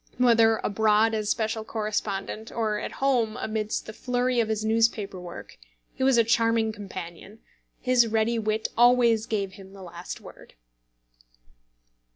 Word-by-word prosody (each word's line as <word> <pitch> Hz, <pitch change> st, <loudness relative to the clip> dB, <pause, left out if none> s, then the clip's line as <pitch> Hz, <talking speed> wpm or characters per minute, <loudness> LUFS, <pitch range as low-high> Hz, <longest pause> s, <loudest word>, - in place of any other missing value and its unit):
Whether 230 Hz, -2 st, +4 dB
abroad 215 Hz, +1 st, +2 dB
as 215 Hz, -1 st, -1 dB
special 220 Hz, -1 st, -1 dB
correspondent, 215 Hz, 0 st, -4 dB
or 215 Hz, -2 st, -1 dB
at -, -, -6 dB
home 245 Hz, -5 st, 0 dB
amidst 215 Hz, -1 st, -3 dB
the 215 Hz, -, -8 dB
flurry 250 Hz, +1 st, -1 dB
of 225 Hz, -2 st, +1 dB
his 215 Hz, 0 st, -1 dB
newspaper 220 Hz, -3 st, +1 dB
work, 175 Hz, -, -10 dB, 0.3 s
he -, -, -10 dB
was 265 Hz, -2 st, +4 dB
a 230 Hz, -, +6 dB
charming 230 Hz, -1 st, +2 dB
companion; 190 Hz, -1 st, -9 dB, 0.4 s
his 250 Hz, -2 st, +3 dB
ready 225 Hz, +1 st, +1 dB
wit 215 Hz, 0 st, -1 dB
always 235 Hz, -2 st, +4 dB
gave 200 Hz, -3 st, -2 dB
him 195 Hz, 0 st, -13 dB
the 195 Hz, -1 st, -11 dB
last 175 Hz, 0 st, -8 dB
word. -, -, -15 dB
220 Hz, 145 wpm, -26 LUFS, 210-230 Hz, 0.4 s, a